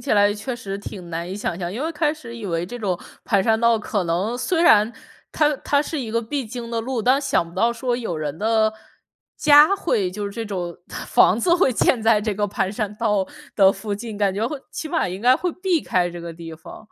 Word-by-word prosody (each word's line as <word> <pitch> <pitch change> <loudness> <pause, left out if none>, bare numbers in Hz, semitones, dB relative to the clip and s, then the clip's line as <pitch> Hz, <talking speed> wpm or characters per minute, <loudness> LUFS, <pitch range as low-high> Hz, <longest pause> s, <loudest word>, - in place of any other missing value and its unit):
起 280 - -1
来 205 0 +4
确 220 +5 -4
实 195 -4 -5
挺 190 -3 -8
难 170 +2 -4
以 - - -4
想 195 -4 -3
象。 175 -1 -4
因 235 +7 -4
为 320 - -1
开 300 -1 0
始 235 -7 -10
以 225 - -8
为 170 -1 -2
这 245 +6 -7
种 190 -6 -1 0.3
盘 200 -5 +2
山 220 +2 +2
道 235 0 +3
可 205 -2 -2
能 185 +8 -1
虽 330 +7 0
然 215 -6 +5 0.4
它 300 -2 +2
它 285 - +1
是 305 +1 -3
一 240 -5 -4
个 230 +1 +1
必 265 +4 -3
经 235 +1 -7
的 230 -1 -1
路， 245 +1 -2
但 260 +5 +3
想 265 -11 0
不 170 - -15
到 235 +1 +2
说 240 +1 -1
有 225 -9 -3
人 155 0 -4
的 220 0 +2 0.6
家 295 +6 +7
会 210 - 0
就 205 +2 -5
是 - - -5
这 225 +3 -5
种 180 -5 -4 0.4
房 195 - +5
子 345 +7 +3
会 350 -7 +3
建 235 0 +2
在 220 -1 +4
这 210 -1 -2
个 205 +1 0
盘 195 -1 -1
山 210 0 -3
道 210 -4 +1 0.3
的 195 -2 +6
附 205 +1 -4
近， 220 +1 -7
感 200 -2 +1
觉 215 +3 0
会 285 +4 -4
起 315 - -5
码 325 - 0
应 185 +2 -6
该 250 +3 +5
会 355 +6 -1
避 365 -1 0
开 175 -1 +1
这 175 0 -8
个 170 0 -7
地 165 0 -9
方。 160 +7 -12
220 Hz, 265 characters per minute, -22 LUFS, 195-255 Hz, 0.6 s, 家